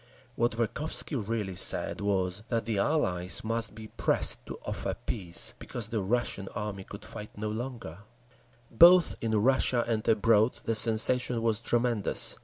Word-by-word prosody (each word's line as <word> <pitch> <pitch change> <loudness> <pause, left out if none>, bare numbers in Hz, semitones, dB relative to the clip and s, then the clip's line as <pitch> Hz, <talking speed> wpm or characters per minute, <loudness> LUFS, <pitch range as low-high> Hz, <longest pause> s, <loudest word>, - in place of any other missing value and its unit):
What 120 0 0
Verkhovsky 120 +7 -1
really 105 -4 -3
said 90 - +1
was 95 -1 -1
that 115 -3 -2
the 110 -3 -1
Allies 95 - 0
must 115 -1 -3
be 110 0 -10
pressed - - 0
to - - -7
offer - - -3
peace, 90 -7 +3
because 115 -3 -5
the 110 -2 -2
Russian 100 -1 -2
army 100 -2 -5
could - - -11
fight 105 0 -8
no 105 +1 -4
longer…. 115 -7 -7 0.7
Both 175 +8 +6
in 115 -1 -2
Russia 125 0 +2
and 110 -2 -2
abroad 110 +1 +3
the 115 - 0
sensation 115 +2 +2
was 115 -1 0
tremendous. 120 -3 +2
110 Hz, 150 wpm, -28 LUFS, 105-120 Hz, 0.7 s, Both